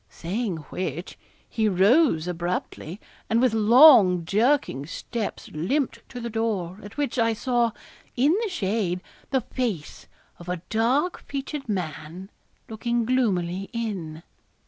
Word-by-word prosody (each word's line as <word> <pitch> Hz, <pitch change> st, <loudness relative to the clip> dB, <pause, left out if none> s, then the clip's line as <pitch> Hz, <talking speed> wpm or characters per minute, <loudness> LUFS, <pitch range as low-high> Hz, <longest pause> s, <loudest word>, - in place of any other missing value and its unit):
Saying 195 Hz, +1 st, -3 dB
which, 175 Hz, -1 st, -4 dB, 0.3 s
he 220 Hz, -1 st, 0 dB
rose 195 Hz, -, +4 dB
abruptly, 175 Hz, 0 st, -4 dB, 0.3 s
and 225 Hz, -, +3 dB
with 250 Hz, -2 st, +3 dB
long 220 Hz, -, +7 dB
jerking 210 Hz, -, +1 dB
steps 220 Hz, +5 st, -5 dB
limped 255 Hz, -, -1 dB
to 245 Hz, -, -7 dB
the 235 Hz, -, -4 dB
door, 215 Hz, -5 st, -2 dB
at 205 Hz, +4 st, -11 dB
which, 280 Hz, -4 st, -1 dB
I 230 Hz, 0 st, +3 dB
saw, 240 Hz, +1 st, +1 dB, 0.5 s
in 285 Hz, +7 st, +3 dB
the 450 Hz, -, -1 dB
shade, 195 Hz, -, -1 dB, 0.3 s
the 265 Hz, -1 st, +1 dB
face 225 Hz, -, -4 dB, 0.3 s
of 175 Hz, 0 st, -10 dB
a 180 Hz, -1 st, -3 dB
dark 255 Hz, +10 st, +1 dB
featured 275 Hz, -1 st, -5 dB
man, 180 Hz, 0 st, -5 dB, 0.4 s
looking 235 Hz, +1 st, -1 dB
gloomily 195 Hz, -7 st, 0 dB
in. 185 Hz, -9 st, -4 dB
220 Hz, 125 wpm, -25 LUFS, 180-245 Hz, 0.5 s, long